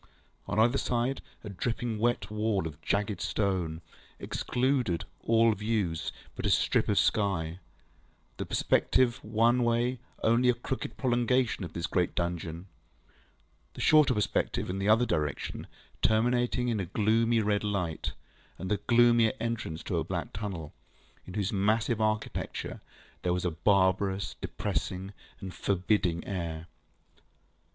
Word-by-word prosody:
On -, -, -2 dB
either 120 Hz, +5 st, +4 dB
side, 125 Hz, +2 st, -1 dB, 0.2 s
a 105 Hz, -, -6 dB
dripping 115 Hz, +3 st, -2 dB
wet 120 Hz, -1 st, 0 dB
wall 105 Hz, -4 st, 0 dB
of 80 Hz, -2 st, -7 dB
jagged 100 Hz, -2 st, -1 dB
stone, 90 Hz, -6 st, -1 dB, 0.4 s
excluding 125 Hz, -, 0 dB, 0.2 s
all 115 Hz, 0 st, +4 dB
view 105 Hz, -4 st, 0 dB, 0.4 s
but -, -, -6 dB
a -, -, +2 dB
strip -, -, +2 dB
of -, -, +2 dB
sky; 90 Hz, -5 st, +1 dB, 0.8 s
the -, -, -3 dB
perspective 125 Hz, -1 st, +2 dB
one 115 Hz, +3 st, +3 dB
way 120 Hz, +2 st, +1 dB, 0.2 s
only 120 Hz, +2 st, +4 dB
a 125 Hz, -, +4 dB
crooked 125 Hz, +2 st, -5 dB
prolongation 125 Hz, -3 st, +1 dB
of 85 Hz, -, -7 dB
this 85 Hz, -1 st, -2 dB
great 90 Hz, -2 st, 0 dB
dungeon; 85 Hz, 0 st, -3 dB, 1.1 s
the -, -, -9 dB
shorter 150 Hz, -5 st, +5 dB
perspective 105 Hz, -3 st, 0 dB
in 95 Hz, -, -3 dB
the 100 Hz, +2 st, 0 dB
other 115 Hz, +3 st, +5 dB
direction 75 Hz, -, -2 dB, 0.3 s
terminating 120 Hz, +2 st, +2 dB
in 110 Hz, -3 st, 0 dB
a 95 Hz, -, -1 dB
gloomy 115 Hz, +4 st, +2 dB
red 105 Hz, -1 st, +1 dB
light, 90 Hz, -6 st, -2 dB, 0.4 s
and 95 Hz, -, -5 dB
the 105 Hz, -, +3 dB
gloomier 115 Hz, +1 st, +4 dB
entrance 115 Hz, -9 st, -3 dB
to -, -, -2 dB
a -, -, -1 dB
black -, -, -4 dB
tunnel, 95 Hz, -7 st, -5 dB, 0.5 s
in 90 Hz, -, -8 dB
whose 105 Hz, +1 st, -1 dB
massive 110 Hz, +3 st, +1 dB
architecture 110 Hz, 0 st, -2 dB, 0.4 s
there 90 Hz, -1 st, +1 dB
was 90 Hz, 0 st, -2 dB
a 90 Hz, -, +1 dB
barbarous, 95 Hz, +3 st, +2 dB
depressing, 95 Hz, +2 st, -3 dB, 0.3 s
and 95 Hz, -2 st, -7 dB
forbidding 90 Hz, -1 st, 0 dB
air. 85 Hz, -4 st, -4 dB
105 Hz, 135 wpm, -29 LUFS, 90-115 Hz, 1.1 s, shorter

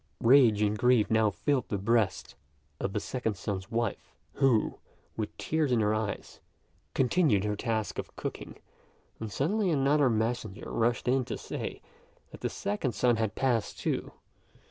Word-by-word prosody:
Rage 115 Hz, -4 st, +6 dB
and 105 Hz, 0 st, +1 dB
grief 120 Hz, -1 st, +3 dB
now 110 Hz, -1 st, +4 dB
filled 130 Hz, +4 st, -1 dB
the 100 Hz, -, -1 dB
breast 105 Hz, 0 st, 0 dB, 0.5 s
of 95 Hz, -, -2 dB
the 105 Hz, -, 0 dB
second 110 Hz, -3 st, -3 dB
son's 95 Hz, +1 st, -4 dB
wife, 115 Hz, -2 st, -3 dB, 0.2 s
who, 130 Hz, -6 st, +2 dB, 0.4 s
with 110 Hz, -2 st, -4 dB
tears 155 Hz, -4 st, 0 dB
in 120 Hz, -, +3 dB
her 105 Hz, 0 st, +2 dB
eyes, 110 Hz, -2 st, -4 dB, 0.6 s
continued 130 Hz, -, +3 dB
her 105 Hz, 0 st, -1 dB
task 110 Hz, -1 st, -2 dB
of -, -, -7 dB
cooking, -, -, -6 dB, 0.6 s
when 110 Hz, -, -4 dB
suddenly 185 Hz, -, 0 dB
another 145 Hz, -2 st, +3 dB
messenger 110 Hz, -2 st, -2 dB
rushed 120 Hz, +1 st, 0 dB
in 130 Hz, +1 st, +3 dB
to -, -, -4 dB
say, -, -, -6 dB, 0.5 s
that -, -, -11 dB
the -, -, -1 dB
second 105 Hz, +5 st, -2 dB
son 120 Hz, -2 st, +3 dB
had 110 Hz, -2 st, -1 dB
passed, 120 Hz, -5 st, 0 dB
too. -, -, -2 dB
115 Hz, 155 wpm, -29 LUFS, 105-130 Hz, 0.6 s, Rage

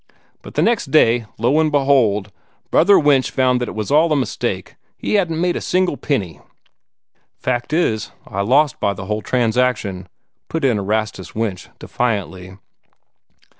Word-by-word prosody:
But -, -, -12 dB
the -, -, +2 dB
next 230 Hz, -11 st, +1 dB
day, 120 Hz, -6 st, +3 dB
lo, 125 Hz, +7 st, +2 dB
and 155 Hz, -1 st, +2 dB
behold, 125 Hz, -8 st, +2 dB, 0.4 s
Brother 195 Hz, +4 st, +5 dB
Winch 145 Hz, -3 st, +3 dB
found 125 Hz, -1 st, +1 dB
that 125 Hz, -, -2 dB
it -, -, -8 dB
was 110 Hz, +3 st, -4 dB
all 155 Hz, +3 st, +4 dB
a -, -, +3 dB
mistake 135 Hz, -3 st, -3 dB, 0.2 s
he -, -, -3 dB
hadn't 175 Hz, -6 st, +1 dB
made 175 Hz, 0 st, +1 dB
a -, -, -3 dB
single 185 Hz, -3 st, 0 dB
penny." 95 Hz, -, -3 dB, 1.0 s
"Fact 120 Hz, +1 st, -2 dB
is, 150 Hz, -, 0 dB, 0.2 s
I 100 Hz, -, -4 dB
lost 135 Hz, +8 st, +2 dB
by 100 Hz, -, 0 dB
the 95 Hz, -, -7 dB
whole 105 Hz, +2 st, -2 dB
transaction," 115 Hz, -6 st, 0 dB, 0.4 s
put 165 Hz, -3 st, -2 dB
in 120 Hz, -6 st, +2 dB
Erastus 105 Hz, -1 st, -3 dB
Winch, 105 Hz, -5 st, -3 dB
defiantly. 95 Hz, -5 st, -3 dB
125 Hz, 155 wpm, -19 LUFS, 105-150 Hz, 1.0 s, Brother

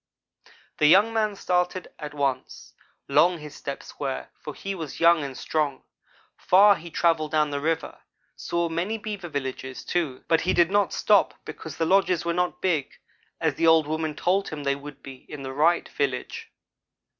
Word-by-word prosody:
"The 150 Hz, -, +5 dB
young 200 Hz, +8 st, +5 dB
man 215 Hz, -2 st, 0 dB
started 180 Hz, -1 st, -1 dB
at 150 Hz, -2 st, -7 dB
once. 135 Hz, -3 st, -3 dB, 0.3 s
Long 175 Hz, +1 st, +4 dB
his 150 Hz, -2 st, -10 dB
steps 140 Hz, -1 st, -8 dB
were, 135 Hz, -2 st, -3 dB
for 150 Hz, -, -9 dB
he 195 Hz, -, -5 dB
was 160 Hz, -6 st, -7 dB
young 170 Hz, -2 st, +5 dB
and 135 Hz, -2 st, -6 dB
strong. 150 Hz, -4 st, -2 dB, 0.5 s
Far 200 Hz, +3 st, +6 dB
he 170 Hz, 0 st, -9 dB
travelled 165 Hz, -2 st, +1 dB
down 150 Hz, -1 st, +2 dB
the 145 Hz, -, -2 dB
river 160 Hz, +2 st, -2 dB, 0.4 s
saw 170 Hz, 0 st, -1 dB
many 175 Hz, +7 st, -2 dB
beaver 205 Hz, -5 st, -6 dB
villages, 130 Hz, -2 st, -5 dB
too, 160 Hz, -8 st, -2 dB
but 165 Hz, -1 st, +3 dB
he 185 Hz, -, +1 dB
did 175 Hz, 0 st, +3 dB
not 205 Hz, -1 st, +2 dB
stop, 205 Hz, -2 st, +3 dB
because 160 Hz, -2 st, -8 dB
the 165 Hz, -, +1 dB
lodges 185 Hz, -1 st, +2 dB
were 170 Hz, -, 0 dB
not 180 Hz, +1 st, -2 dB
big, 165 Hz, -7 st, 0 dB, 0.5 s
as -, -, +1 dB
the 165 Hz, -, +1 dB
old 160 Hz, -1 st, +6 dB
woman 155 Hz, 0 st, -2 dB
told 190 Hz, +5 st, 0 dB
him 150 Hz, -2 st, -6 dB
they 140 Hz, 0 st, +1 dB
would 145 Hz, +1 st, -11 dB
be 135 Hz, -1 st, -9 dB
in 145 Hz, -2 st, -7 dB
the 130 Hz, 0 st, -5 dB
right 160 Hz, +5 st, +2 dB
village. 135 Hz, -3 st, -3 dB
160 Hz, 180 wpm, -25 LUFS, 145-180 Hz, 0.5 s, Far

